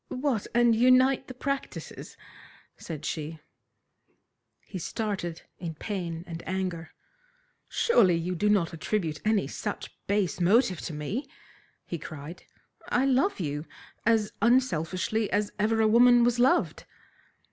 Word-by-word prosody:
"What, 255 -5 -1
and 240 -1 +5
unite 255 +3 +4
the 255 - -9
practices?" 275 +2 -5 0.6
said 155 -3 -7
she. 155 +1 -4 1.3
He 185 - -6
started 185 -3 -3 0.2
in 165 -2 -5
pain 170 -3 -4
and 170 -2 -7
anger. 185 -3 -3 0.8
"Surely 195 - +4
you 170 +2 -2
do 205 +4 +1
not 185 -5 +2
attribute 165 -2 -2
any 215 -1 +2
such - - -5
base 200 -4 0
motive 185 0 +3
to 165 - -6
me!" 200 - -4 0.6
he 170 - -5
cried. 155 +2 -9 0.4
"I 255 +2 +2
love 275 - +2
you 150 -2 -3 0.4
as 220 -2 +2
unselfishly 215 -3 +1
as 205 +1 0
ever 220 +2 +2
a 220 - +4
woman 240 +2 +6
was 240 0 +2
loved." 265 +9 +2
205 Hz, 125 wpm, -28 LUFS, 170-240 Hz, 1.3 s, woman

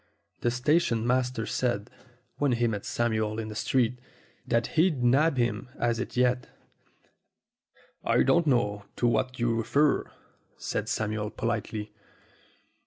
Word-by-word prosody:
The 120 - +1
sta 130 +7 +3
tion 115 -9 -1
master 125 -2 0
said, 120 -2 -1 0.5
when 145 -3 +2
he 120 0 +1
met 105 -3 -2
Samuel 110 -2 0
in 110 -1 -4
the 105 - -7
street, 125 +1 +1 0.5
that 115 0 +2
he'd 160 -6 +2
nab 140 +4 +4
him 120 +1 -1
at 120 -1 0
it 125 - -5
yet. 125 0 +2 1.5
"I - - +3
don't 160 +5 +3
know 105 -6 +1
to - - -1
what 130 +2 +1
you 120 -1 +1
refer," 130 +6 +2 0.5
said - - -3
Samuel 105 -1 -1
politely. 110 -2 -3
120 Hz, 135 wpm, -28 LUFS, 110-130 Hz, 1.5 s, nab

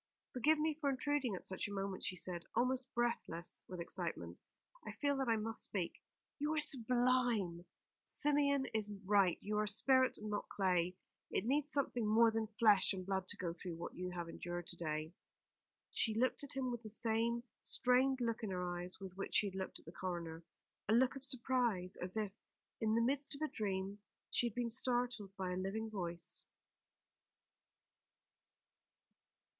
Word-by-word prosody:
"Forgive 300 +5 +4
me 310 +1 +2
for 285 - +2
intruding 270 -4 +1
at - - -8
such 190 - -2
a - - -7
moment," 195 -1 -3
he 185 - -1
said, 175 -1 -2
almost 255 +2 +1
breathless 230 -8 -1
with 180 -1 -6
excitement. 165 - -3 0.4
"I - - -6
feel 285 -1 +1
that 270 -1 0
I 225 - +5
must 225 +1 -2
speak. 185 -4 -2 0.4
You 295 +1 0
were 315 0 +2
sublime! 245 - +2 0.4
Symeon 280 -2 +2
is 215 -1 +1
right. 195 -3 +4
You 210 0 -1
are 215 - +1
spirit 260 +5 +4
and 215 0 -5
not 205 - -2
clay. 180 -2 +1 0.3
It - - 0
needs 290 +4 +2
something 250 -6 +1
more 225 +2 +6
than 220 0 0
flesh 205 -4 +6
and 185 -1 -4
blood 190 -1 -1
to 205 - -5
go 175 -3 -2
through 175 0 -6
what 170 - -6
you 180 0 -4
have 175 -1 -4
endured 175 +1 -5
to - - -3
day." 155 -1 -3 0.8
She 220 -2 +1
looked 255 +5 +2
at 285 - -5
him 255 -2 0
with 240 -1 -4
the 220 - -8
same 230 +2 0 0.2
strained 255 +1 +3
look 230 -1 0
in 220 - -2
her 180 -1 -2
eyes 180 +1 -6
with 190 -2 -8
which 195 - -3
she 205 - +5
had 190 - -11
looked 190 0 -4
at - - -14
the 165 - -8
coroner; 170 -2 -4 0.5
a - - +5
look 250 +3 +4
of 270 - -4
surprise, 240 -8 +2
as 180 +4 -3
if, 210 -2 0 0.5
in 220 0 +2
the 230 - +4
midst 280 +3 +1
of 280 - -10
a - - +2
dream, 195 -1 -2 0.3
she 240 - +2
had 230 - -6
been 240 -1 0
startled 245 -4 0
by 185 -1 -2
a - - -1
living 215 +4 -2
voice. 175 -4 -3
215 Hz, 180 wpm, -38 LUFS, 185-250 Hz, 0.8 s, more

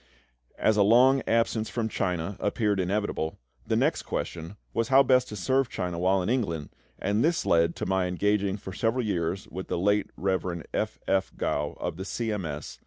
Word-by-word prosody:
As 110 -1 +2
a - - +5
long 125 +6 +5
absence 115 -1 +1
from 115 -2 -1
China 90 -2 -2
appeared 105 -1 0
inevitable, 95 -4 -1 0.3
the - - +1
next - - +2
question 85 +4 -5 0.2
was 115 -1 0
how 135 +1 +6
best 130 -1 +3
to 105 - -6
serve 130 +7 +1
China 90 -2 -3
while 95 +1 +2
in - - -3
England, 100 - -1 0.3
and 105 +3 0
this 165 +1 +1
led 85 0 +3
to - - -4
my 95 -1 +1
engaging 100 +2 +1
for 95 -2 -8
several 115 +4 0
years, 90 -1 -2
with 95 +1 -6
the - - -2
late 100 +3 +2
Rev. 95 -3 -1
F. - - -1
F. 95 0 +1
Gough - - -1
of - - -3
the 95 - -5
C. 115 +2 -2
M. 105 -4 -2
S. 75 0 -7
100 Hz, 190 wpm, -27 LUFS, 90-115 Hz, 0.3 s, how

